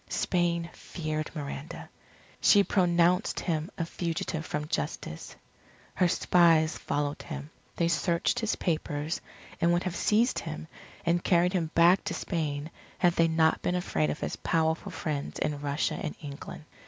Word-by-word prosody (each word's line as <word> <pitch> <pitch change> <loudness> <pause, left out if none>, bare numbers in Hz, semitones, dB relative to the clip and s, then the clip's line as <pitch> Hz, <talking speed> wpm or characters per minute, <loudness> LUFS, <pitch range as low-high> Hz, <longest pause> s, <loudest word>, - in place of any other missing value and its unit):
Spain 170 -2 0
feared 155 -2 -4
Miranda. 145 0 -6 0.5
She 205 -1 +6
pronounced 180 0 +2
him 160 -2 -1
a 165 - -1
fugitive 165 -1 -3
from 150 0 -3
justice. 75 - -4 0.6
Her 180 - +3
spies 165 -3 +4
followed 145 0 -2
him. 150 -1 -7 0.2
They 170 - +1
searched 170 +1 +1
his 220 -1 0
papers; 155 -2 -2 0.4
and 170 - +4
would 175 +1 +2
have 185 -2 -3
seized 230 +4 +2
him 160 -1 -6 0.4
and 170 +1 +2
carried 180 +1 +3
him 170 -4 0
back 170 +3 +6
to - - -2
Spain, 155 -3 -3 0.3
had 175 -2 +3
they 165 -1 +4
not 160 0 +3
been 180 - 0
afraid 80 - 0
of 75 - -4
his - - -3
powerful 160 0 0
friends 145 -3 -3
in 145 -1 -1
Russia 145 +1 -1
and 155 - -4
England. 145 +1 -8
165 Hz, 150 wpm, -29 LUFS, 150-175 Hz, 0.6 s, She